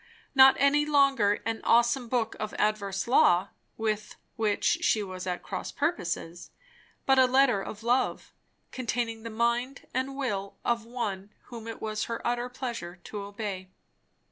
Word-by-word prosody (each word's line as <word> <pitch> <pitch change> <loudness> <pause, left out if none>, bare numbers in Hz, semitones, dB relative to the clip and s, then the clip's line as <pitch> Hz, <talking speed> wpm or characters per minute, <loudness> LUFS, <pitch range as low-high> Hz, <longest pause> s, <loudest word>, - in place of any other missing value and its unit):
Not 265 -1 +8
any 280 +1 +4
longer 275 -8 +3
an 225 0 -2
awesome 240 +1 +3
book 230 -3 0
of 215 0 -4
adverse 200 -2 -1
law, 190 -6 +4 0.3
with 215 -1 -2 0.2
which 215 -2 +1
she 215 - +2
was 185 -1 -7
at 180 -1 -3
cross 185 - -5
purposes; 175 - -3 0.6
but 265 -1 +4
a 260 - +7
letter 255 -5 +4
of 210 +2 -8
love, 245 +2 0 0.4
containing 235 -2 -2
the 230 - -6
mind 235 +4 -1
and 260 +2 -2
will 200 -8 -3
of 235 -2 0
One 210 -5 -4 0.2
whom 230 -1 -8
it 225 - -7
was 215 0 -2
her 230 - -4
utter 240 +1 -1
pleasure 235 -9 -5
to 210 - -6
obey. 200 -2 -6
230 Hz, 150 wpm, -28 LUFS, 205-255 Hz, 0.6 s, Not